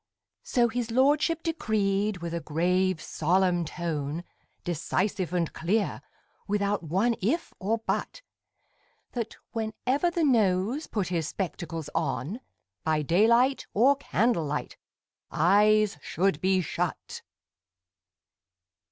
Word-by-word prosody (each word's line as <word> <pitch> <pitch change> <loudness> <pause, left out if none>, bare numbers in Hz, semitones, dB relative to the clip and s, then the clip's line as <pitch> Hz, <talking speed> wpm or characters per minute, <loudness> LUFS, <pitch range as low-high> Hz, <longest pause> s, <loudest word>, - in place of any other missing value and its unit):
So 240 -1 +2
his 235 0 -3
lordship 290 +7 +2
decreed 205 - 0
with 170 -1 -4
a 170 - -1
grave 180 +3 +1
solemn 175 +3 +1
tone, 160 -1 -3 0.4
Decisive 180 +2 -1
and 175 -3 -1
clear, 205 +6 0 0.5
without 205 0 0
one 190 +9 +1
if 300 - -1
or 215 +4 0
but - - -2 0.9
That, 230 -2 -4 0.2
whenever 250 +8 0
the 340 -1 -1
Nose 225 - +2
put 200 -5 -2
his 165 -4 -1
spectacles 165 -4 -4
on, 165 - -2 0.4
By 155 -1 +1
daylight 235 - +3
or 260 +7 +5
candlelight 200 - -1 0.5
Eyes 205 +2 +3
should 175 0 0
be 185 0 +3
shut! 160 - -4
195 Hz, 105 wpm, -27 LUFS, 170-230 Hz, 0.9 s, or